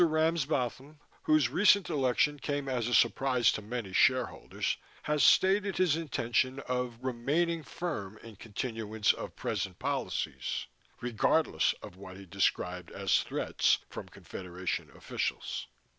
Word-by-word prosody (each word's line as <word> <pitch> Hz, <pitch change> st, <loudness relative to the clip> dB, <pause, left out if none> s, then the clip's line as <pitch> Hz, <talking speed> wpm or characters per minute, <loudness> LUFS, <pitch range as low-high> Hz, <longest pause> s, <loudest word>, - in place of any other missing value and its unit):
Ramsbotham, 155 Hz, -4 st, 0 dB, 0.2 s
whose 155 Hz, -5 st, +3 dB
recent 200 Hz, +6 st, +5 dB
election 145 Hz, 0 st, +1 dB
came 145 Hz, 0 st, -2 dB
as 125 Hz, -3 st, -1 dB
a 120 Hz, -, -1 dB
surprise 120 Hz, +1 st, +4 dB
to -, -, -4 dB
many 105 Hz, -2 st, -5 dB
shareholders, 130 Hz, +4 st, +1 dB, 0.3 s
has 150 Hz, -1 st, +1 dB
stated 195 Hz, 0 st, +4 dB
his 180 Hz, -5 st, +3 dB
intention 130 Hz, -4 st, 0 dB
of 125 Hz, -2 st, -2 dB
"remaining 150 Hz, +7 st, 0 dB
firm 115 Hz, -, -5 dB
in 115 Hz, -2 st, -11 dB
continuance 110 Hz, 0 st, -1 dB
of -, -, -7 dB
present -, -, -3 dB
policies" -, -, -2 dB, 0.4 s
regardless 120 Hz, -, +2 dB
of 90 Hz, -, -10 dB
what 95 Hz, -1 st, -10 dB
he 100 Hz, -, -11 dB
described 90 Hz, -1 st, -1 dB
as -, -, +1 dB
"threats" -, -, +1 dB
from -, -, -7 dB
Confederation 90 Hz, 0 st, -5 dB
officials. -, -, -3 dB
125 Hz, 125 wpm, -31 LUFS, 110-155 Hz, 0.4 s, recent